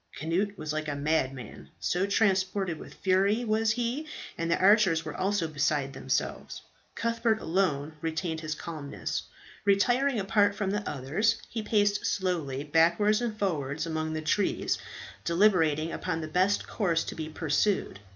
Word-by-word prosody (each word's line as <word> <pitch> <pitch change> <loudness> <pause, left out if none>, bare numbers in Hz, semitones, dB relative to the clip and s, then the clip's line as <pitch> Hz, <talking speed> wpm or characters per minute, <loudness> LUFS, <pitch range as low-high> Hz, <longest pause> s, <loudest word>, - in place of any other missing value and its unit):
Cnut 190 +6 -1
was 155 -2 -4
like 155 0 -2
a 145 - -2
madman, 135 -5 -2
so 180 +3 0
transported 190 -4 +1
with - - -11
fury 200 +5 +2
was 220 0 +1
he; 245 +6 -1 0.3
and 165 0 -2
the 170 - +3
archers 190 -5 +4
were 150 - -5
also 195 -3 0
beside 145 -2 0
themselves. - - -3 0.3
Cuthbert 230 -1 +1
alone 160 -5 0
retained 160 0 -2
his 155 -1 -3
calmness. 150 -3 -4 0.4
Retiring 240 +6 +3
apart 205 +1 +2
from 200 -2 -1
the 205 +1 -1
others, 165 - 0
he 225 - -2
paced 205 -1 +2
slowly 165 -8 -1
backwards 170 +8 +3
and 230 -3 -2
forwards 155 -6 -1
among 160 -1 -2
the 155 0 -3
trees, 200 +5 0 0.4
deliberating 165 -4 +3
upon 165 -3 -3
the 155 - -4
best 185 +5 +1
course 170 -6 0
to - - -5
be 155 -1 -5
pursued. 160 - 0
180 Hz, 150 wpm, -28 LUFS, 155-205 Hz, 0.4 s, archers